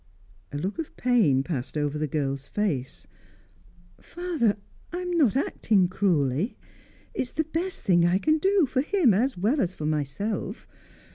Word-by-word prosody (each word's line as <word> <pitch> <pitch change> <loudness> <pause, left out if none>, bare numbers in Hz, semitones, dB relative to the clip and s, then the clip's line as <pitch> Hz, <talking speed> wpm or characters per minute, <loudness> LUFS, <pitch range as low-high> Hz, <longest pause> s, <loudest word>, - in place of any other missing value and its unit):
A 145 - -4
look 190 - -3
of 320 - -5
pain 210 - +3
passed 140 -2 -4
over 145 0 -1
the 155 - 0
girl's 135 -2 -2
face. 145 -10 -2 0.9
"Father 330 - -1 0.3
I 350 - -3
am 360 0 -3
not 280 - +3
acting 210 -8 +2
cruelly. 175 - +1 0.6
It - - -1
is 250 - -4
the 315 - +1
best 330 +4 -4
thing 175 -3 +4
I 175 +2 +4
can 310 +9 +2
do, 385 -1 +3
for 260 0 0
him 315 - +3
as 245 +5 +1
well 230 +11 +2
as 185 0 -1
for 155 - -5
myself. 155 +8 -2
205 Hz, 160 wpm, -26 LUFS, -, 0.9 s, thing